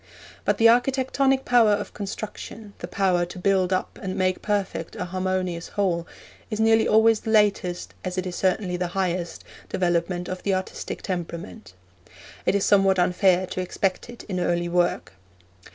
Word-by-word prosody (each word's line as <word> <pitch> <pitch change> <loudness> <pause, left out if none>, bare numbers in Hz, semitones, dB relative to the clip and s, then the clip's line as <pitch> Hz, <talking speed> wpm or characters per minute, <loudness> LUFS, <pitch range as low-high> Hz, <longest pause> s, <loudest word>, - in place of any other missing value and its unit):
But - - +2
the 230 - +6
architectonic 265 +2 +2
power 235 -4 +5
of 205 0 -3
construction, 210 +1 -7
the - - -5
power 185 -3 +1
to 175 - -10
build 190 0 +2
up 185 - -2
and 190 -1 -4
make 185 -1 0
perfect 200 -5 -2
a 180 - -3
harmonious 185 -1 -2
whole, 180 -5 -1 0.4
is 215 -2 -3
nearly 225 0 +4
always 220 0 +5
the - - -6
latest, 205 -5 +1
as 185 0 -4
it 185 -1 -2
certainly 185 +1 0
is 180 - -2
the 180 - 0
highest, 180 -2 -2 0.3
development 175 0 0
of 185 0 -5
the 195 -2 +1
artistic 185 0 -5
temperament. 175 - -6 0.7
It - - +3
is 200 - +2
somewhat 195 -1 +4
unfair 180 +1 +3
to 185 - -4
expect 185 +4 -2
it 240 - -10
in 185 -3 -4
early 175 -1 0
work. 175 - 0
185 Hz, 165 wpm, -24 LUFS, 180-210 Hz, 0.7 s, the